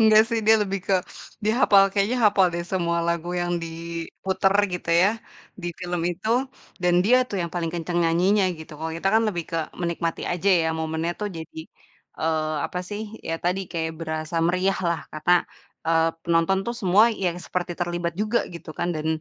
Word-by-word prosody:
Engga 220 -1 +7
sih 230 - 0
dia 220 - +8
lebih 195 -1 -2
ke 195 - +3 0.5
dihapal, 215 -3 +5
kayaknya 210 +5 +1
hapal 200 -2 +5
deh 170 - -2
semua 170 -1 -1
lagu 170 +1 -1
yang 175 0 -1
diputer 170 +4 -2 0.2
gitu 180 -1 -3
ya, 190 - +6 0.5
di - - -3
film 175 -1 -3
itu. 180 +5 -5 0.5
Dan 175 0 +4
dia 245 +5 +5
tuh 200 - -4
yang 170 - -4
paling 170 -1 -1
kenceng 175 +1 -2
nyanyinya 185 +5 +3
gitu. 160 0 -10
Kalau 160 0 -4
kita 165 +4 -1
kan 225 - +5
lebih 175 -4 -3
ke 165 - -1 0.2
menikmati 170 -1 -2
aja 175 +2 -4 0.2
ya 160 - +1
momennya 160 +1 -2
tuh, 210 - -1
jadi, 160 0 -8 0.6
eee, 155 -1 0
apa 180 - -5
sih, 210 +1 -4 0.2
ya 165 - -1
tadi 180 +2 +1
kayak 160 -1 -2
berasa 160 0 -4
meriahlah 180 -1 +1
karena, 155 +3 +1 0.5
eee, 165 0 +3
penonton 170 +2 +2
tuh 235 - -2
semua 195 +3 +5
yang 185 -6 -1
seperti 180 0 -3
terlibat 175 0 -1
juga 215 +3 +2 0.2
gitu 170 -1 -9
kan - - 0
dan 155 0 -3
175 Hz, 180 wpm, -24 LUFS, 165-195 Hz, 0.6 s, dia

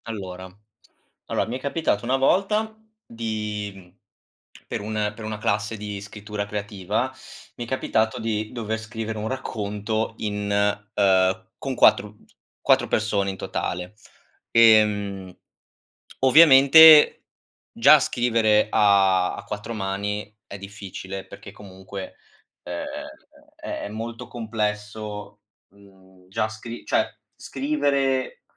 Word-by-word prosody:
Allora, 95 -4 -7 0.8
allora - - -1
mi 120 +3 -3
è - - -12
capitato 140 -6 -1
una 130 +2 +1
volta 210 +10 +1 0.3
di 105 -2 -4
mhmm, 90 0 -17 0.7
per - - -4
un 105 0 -2
per 110 0 -9
una 110 0 -4
classe 105 +1 -1
di 105 -1 -6
scrittura 105 0 -6
creativa, 105 +4 -3 0.4
mi 120 - -6
è - - -14
capitato 110 -3 0
di 110 -1 -3
dover 110 -2 -4
scrivere 110 0 -6
un 105 - -3
racconto 110 -3 -3
in, 105 -1 -3 0.5
uhm, 95 -1 +2
con 135 -1 -4
4 105 -3 +3 0.4
4 - - +3
persone 105 -2 0
in 95 - -5
totale, 90 0 -4 0.6
ehm, 105 -4 +3 0.8
ovviamente, 150 +2 +8 0.5
già - - +6
scrivere 115 -3 +2
a 95 -3 +3
a - - -9
4 105 +2 -6
mani 105 +1 -4
è 100 - -8
difficile, 95 -1 -8
perché, 100 0 -11
comunque, 95 -1 -10 0.5
uhm, 90 - -7 0.8
è - - -6
è - - -6
molto 115 +2 -7
complesso, 105 -2 -5 0.3
mhmm, 95 -2 -21
già 110 +3 -1
scri 115 +2 -9
cioè, - - +2 0.3
scrivere 140 -2 -1
105 Hz, 115 wpm, -23 LUFS, 100-115 Hz, 0.8 s, ovviamente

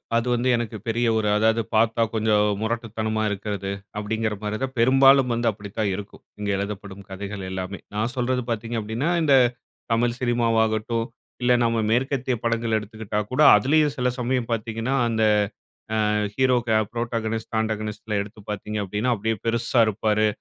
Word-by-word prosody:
அது 115 +1 +1
வந்து 120 +1 +1
எனக்கு 115 -2 -3
பெரிய 115 +1 +1
ஒரு 110 -1 0
அதாவது 110 +1 +3
பார்த்தா 115 +1 +3
கொஞ்சம் 110 -1 +2 0.2
முரட்டுத்தனமா 110 -1 -2
இருக்கறது, 100 -1 -3 0.3
அப்டிங்குற 110 0 -2
மாரி 105 0 -2
தான் 135 0 -2
பெரும்பாலும் 135 +1 +5
வந்து 120 0 0
அப்டித்தான் 105 +1 -4
இருக்கும். 100 +1 -9 0.2
இங்க 105 -1 -3
எழுதப்படும் 100 -1 -6
கதைகள் 100 +1 -6
எல்லாமே. 95 +1 -5 0.2
நான் 110 +4 -1
சொல்றது 125 0 0
பார்த்தீங்க 115 +1 -3
அப்டின்னா, 110 +9 -2
இந்த 145 -3 +5 0.6
தமிழ் 120 +1 +1
சினிமாவாகட்டும் 115 -2 +1 0.4
இல்ல 125 0 +4
நம்ம 115 -1 +1
மேற்கத்திய 130 +1 0
படங்கள் 115 -1 0
எடுத்துக்கிட்டா 105 0 -4
கூட 130 +4 +1
அதிலேயும் 150 +1 +3
சில 125 0 +1
சமயம் 125 -1 -1
பார்த்தீங்கன்னா, 115 +3 -2
அந்த 110 -1 0 0.8
ஆ - - +1 0.3
ஹீரோக்கு 120 -4 +2
புரோட்டகோனிஸ்ட், 115 -1 -3
ஆடகோனிஸ்ட் 110 -1 -3
எடுத்து 105 +1 -9
பார்த்தீங்க 105 +1 -4
அப்டின்னா, 105 +6 0
அப்டியே 110 +2 -1
பெருசா 115 +1 +2
இருப்பாரு. 110 0 +1
115 Hz, 145 wpm, -24 LUFS, 105-120 Hz, 0.8 s, பெரும்பாலும்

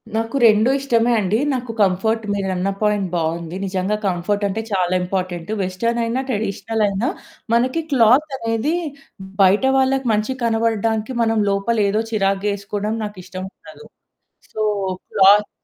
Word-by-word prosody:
నాకు 225 +3 -2
2 220 +2 +5
ఇష్టమే 240 -3 +1
అండి. 205 +3 0
నాకు 250 -2 -3
కంఫర్ట్ 220 +4 +1
మీరన్న 190 -1 -1
పాయింట్ 210 -2 +1
బావుంది 170 +1 -2
నిజంగా 190 +2 -1
కంఫర్టంటే 200 +3 -1
చాలా 185 -2 +1
ఇంపార్టెంటు. 180 0 -3
వెస్టర్న్ 230 +6 -1
అయినా 235 +3 -1
ట్రెడిషనల్ 220 0 -2
అయినా 200 +6 -1 0.4
మనకి 255 +7 +2
క్లాతనేది 255 +1 +2 0.7
బయట 195 +5 +4
వాళ్ళకి 265 0 +1
మంచిగా 215 +5 -1
కనపడడానికి 225 0 0
మనం 225 -1 +1
లోపల 200 +4 0
ఏదో 215 +2 +1
చిరాకుగా 195 -1 0
వేసుకోవడం 205 +2 -3
నాకిష్టముండదు. 190 - -9 0.7
So, 215 - -3 0.5
cloth 205 +2 +5
210 Hz, 120 wpm, -20 LUFS, 195-230 Hz, 0.7 s, 2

